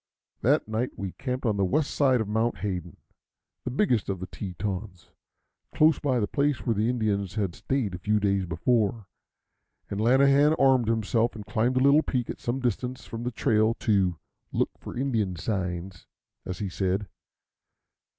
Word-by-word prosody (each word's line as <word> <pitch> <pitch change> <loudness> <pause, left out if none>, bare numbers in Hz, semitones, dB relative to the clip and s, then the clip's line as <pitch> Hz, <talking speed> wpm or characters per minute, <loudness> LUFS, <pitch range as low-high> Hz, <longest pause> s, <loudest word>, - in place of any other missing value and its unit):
That - - +2
night 110 +3 -2
we 100 -2 -4
camped 130 +4 -4
on 105 -3 +1
the 100 - +2
west 140 +11 +1
side 130 -4 +3
of 110 - -3
Mount 110 +3 0
Hayden, 90 -3 -4 0.7
the - - -1
biggest 125 - +1
of 95 -2 -2
the 95 - -4
Tetons, 95 0 -6 0.6
close 155 -1 +4
by 130 -4 +1
the 105 - +1
place 140 +3 0
where 115 - +2
the 110 +2 +1
Indians 105 -5 -1
had 100 -5 -1
stayed 125 -5 -2
a 90 - -5
few 105 +3 +1
days 100 -2 +1
before; 105 +5 0 0.9
and 100 +1 -2
Lanahan 140 +5 +5
armed 130 -4 +4
himself 115 +1 +1
and 105 -2 -8
climbed 110 +6 0
a 130 - +3
little 140 +2 +6
peak 125 -6 -2
at - - -10
some 120 +3 -2
distance 125 +1 -2
from 115 - -6
the 120 - -1
trail 110 -2 +2
to 95 -6 +1 0.3
"look - - 0
for - - -8
Indian 115 -8 0
signs," 90 -1 -4 0.4
as 90 - -4
he 100 - -3
said. 95 +2 -1
110 Hz, 170 wpm, -27 LUFS, 100-125 Hz, 0.9 s, little